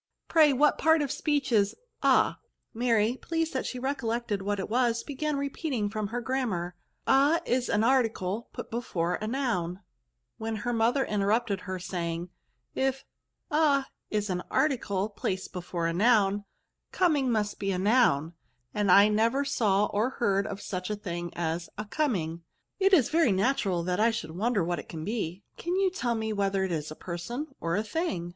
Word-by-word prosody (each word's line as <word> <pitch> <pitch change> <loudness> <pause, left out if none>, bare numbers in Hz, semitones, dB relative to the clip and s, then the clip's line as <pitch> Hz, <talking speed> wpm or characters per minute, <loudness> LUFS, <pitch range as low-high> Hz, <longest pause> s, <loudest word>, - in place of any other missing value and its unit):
" - - -58
Pray 310 -3 +7
what 285 +2 +3
part 320 -1 +4
of 280 - -2
speech 290 -2 0
is 205 -2 +3 0.3
a - - +4 0.2
?" - - -52
Mary, 230 0 +2
pleased 325 -1 -1
that 260 - -2
she 255 - -4
recollected 235 -5 -2
what 205 +1 -1
it 190 - -3
was, 235 0 +1
began 295 +1 -2
repeating 275 -6 -2
from 215 -1 -2
her 240 +3 -4
granunar, 225 -9 -1 0.2
" - - -47
A 285 +5 +4
is 250 0 0
a - - +2
narticle 225 -3 +1
put - - -8
before 180 -7 -1
a 215 - -2
noun," 215 -8 -1 0.3
— - - -53
when 225 0 -3
her 240 +3 -2
mother 235 +4 +2
interrupted 210 0 0
her, 185 -2 -4
saying, 175 -1 -4 0.2
" - - -49 0.2
If 270 0 -8 0.5
a 295 -3 +3 0.2
is 210 -2 -1
an 180 0 -1
article 210 -9 +1
placed 190 -2 -4
before 175 -1 -3
a 165 - 0
noun, 205 0 +3 0.5
coming 295 -8 +2
must 210 -2 -1
be 195 - -2
a 185 - -1
noun; 185 - +3 0.4
and 205 -2 0
as - - +8
I 200 +1 +8
never 230 +6 +2
saw 210 -6 +2
or 210 +4 0
heard 200 -6 0
of 200 0 -6
such 185 0 -4
a 210 - -1
thing 175 -4 -5
as 170 0 -2
a 210 - -4
coming 200 - -1
^ - - -21 0.4
it 390 0 +4
is 305 - +5
very 320 -7 +4
natural 195 -4 +1
that 180 +2 -1
I 225 +2 +5
should 220 -9 -4
wonder 205 +3 0
what 175 -1 -1
it - - -10
can 160 -1 -6
be: 200 -3 -3
can 345 +2 -2
you 385 -1 +2
tell 245 -10 -1
me 220 -1 -2
whether 195 -1 0
it 190 - -2
is 155 -2 -2
a 155 - -7
person 185 - -5
or 165 0 -1
a 210 - 0
thing?" 215 - -2
215 Hz, 195 wpm, -28 LUFS, 185-260 Hz, 0.5 s, as